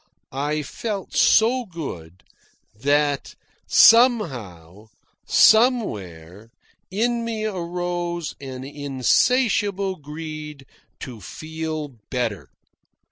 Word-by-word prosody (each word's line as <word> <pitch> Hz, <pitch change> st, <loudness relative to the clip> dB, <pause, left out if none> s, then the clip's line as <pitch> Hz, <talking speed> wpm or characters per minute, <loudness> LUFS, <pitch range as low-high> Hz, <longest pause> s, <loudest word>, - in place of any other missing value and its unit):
I 150 Hz, +3 st, -2 dB
felt 200 Hz, -, -5 dB
so 245 Hz, +4 st, +4 dB
good, 95 Hz, -, -8 dB, 0.5 s
that 145 Hz, +5 st, 0 dB, 0.3 s
somehow, 120 Hz, -, +3 dB, 0.4 s
somewhere, 105 Hz, -, +2 dB, 0.4 s
in 235 Hz, +5 st, 0 dB
me 225 Hz, -2 st, -3 dB
arose 175 Hz, -3 st, -3 dB
an 130 Hz, -2 st, -7 dB
insatiable 190 Hz, -, +1 dB
greed 150 Hz, -1 st, -8 dB, 0.4 s
to 120 Hz, -5 st, -8 dB
feel 155 Hz, -, -6 dB
better. 120 Hz, -7 st, -3 dB
155 Hz, 75 wpm, -22 LUFS, 130-200 Hz, 0.5 s, so